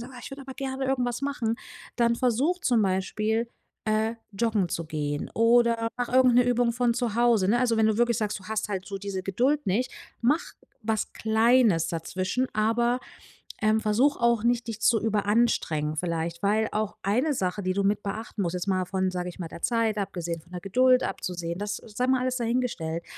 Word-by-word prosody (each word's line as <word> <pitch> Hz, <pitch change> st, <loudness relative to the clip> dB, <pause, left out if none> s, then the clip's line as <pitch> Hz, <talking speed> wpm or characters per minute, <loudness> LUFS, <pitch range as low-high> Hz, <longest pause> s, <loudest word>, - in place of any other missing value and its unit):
sagst: 260 Hz, -, -13 dB
„Ah, -, -, -9 dB
ich -, -, -8 dB
würde 275 Hz, 0 st, -8 dB
aber 265 Hz, 0 st, -8 dB
gerne 265 Hz, 0 st, -3 dB
irgendwas 250 Hz, -1 st, -1 dB
machen“, 260 Hz, -5 st, -1 dB, 0.4 s
dann 235 Hz, -1 st, +3 dB
versuche, 255 Hz, +9 st, +1 dB
zum 245 Hz, -, +2 dB
Beispiel, 215 Hz, +4 st, 0 dB, 0.4 s
äh, 220 Hz, +1 st, +1 dB, 0.2 s
joggen 210 Hz, -2 st, 0 dB
zu 165 Hz, -, -3 dB
gehen 150 Hz, -2 st, -3 dB
oder 230 Hz, 0 st, +3 dB
mache 245 Hz, 0 st, -3 dB
irgend 255 Hz, -1 st, +5 dB
'ne 245 Hz, 0 st, +5 dB
Übung 245 Hz, -1 st, +2 dB
von 240 Hz, 0 st, +1 dB
zu 240 Hz, -3 st, -1 dB
Hause, 235 Hz, -5 st, +3 dB
ne? 235 Hz, +4 st, +3 dB
Also, 240 Hz, -3 st, +2 dB
wenn 220 Hz, -, +4 dB
du 220 Hz, -, +2 dB
wirklich 235 Hz, -1 st, +2 dB
sagst, 210 Hz, -2 st, -2 dB
du -, -, -15 dB
hast 215 Hz, +1 st, -2 dB
halt 190 Hz, -2 st, -4 dB
so 200 Hz, -1 st, -5 dB
diese 195 Hz, -1 st, -4 dB
Geduld 255 Hz, +10 st, 0 dB
nicht, 225 Hz, +7 st, 0 dB, 0.3 s
mache 285 Hz, +8 st, +1 dB, 0.3 s
was 220 Hz, -1 st, -1 dB
Kleines 220 Hz, -5 st, +3 dB
dazwischen, 185 Hz, +9 st, -2 dB
aber, 235 Hz, +3 st, +1 dB, 0.6 s
ähm, 215 Hz, 0 st, +3 dB
versuche 230 Hz, +7 st, +2 dB
auch 235 Hz, -2 st, +3 dB
nicht, 240 Hz, 0 st, +1 dB
dich 225 Hz, -1 st, -5 dB
zu 225 Hz, +1 st, +4 dB
überanstrengen 205 Hz, -8 st, +1 dB
vielleicht, 170 Hz, 0 st, -2 dB
weil 215 Hz, +2 st, +2 dB
auch 215 Hz, -1 st, -2 dB
eine 250 Hz, +10 st, +1 dB
Sache, 190 Hz, -2 st, -2 dB
die 185 Hz, 0 st, -1 dB
du 200 Hz, -, +1 dB
mit 205 Hz, +1 st, +1 dB
beachten 215 Hz, +2 st, -5 dB
musst, 175 Hz, -1 st, -2 dB
jetzt 180 Hz, +2 st, -3 dB
mal 185 Hz, -2 st, +1 dB
von, 190 Hz, 0 st, 0 dB
sage 180 Hz, -1 st, -3 dB
ich 175 Hz, -, -9 dB
mal, 170 Hz, -3 st, -5 dB
der 170 Hz, -, -10 dB
Zeit 230 Hz, -3 st, +1 dB
abgesehen, 175 Hz, -4 st, -3 dB
von 170 Hz, +3 st, -22 dB
der 180 Hz, -, -5 dB
Geduld 255 Hz, +6 st, +4 dB
abzusehen 175 Hz, -1 st, -4 dB
das 205 Hz, 0 st, -3 dB
sei 230 Hz, +3 st, -3 dB
mal 260 Hz, 0 st, +2 dB
alles 255 Hz, 0 st, -1 dB
dahingestellt, 230 Hz, -9 st, -2 dB
220 Hz, 200 wpm, -26 LUFS, 190-245 Hz, 0.6 s, irgend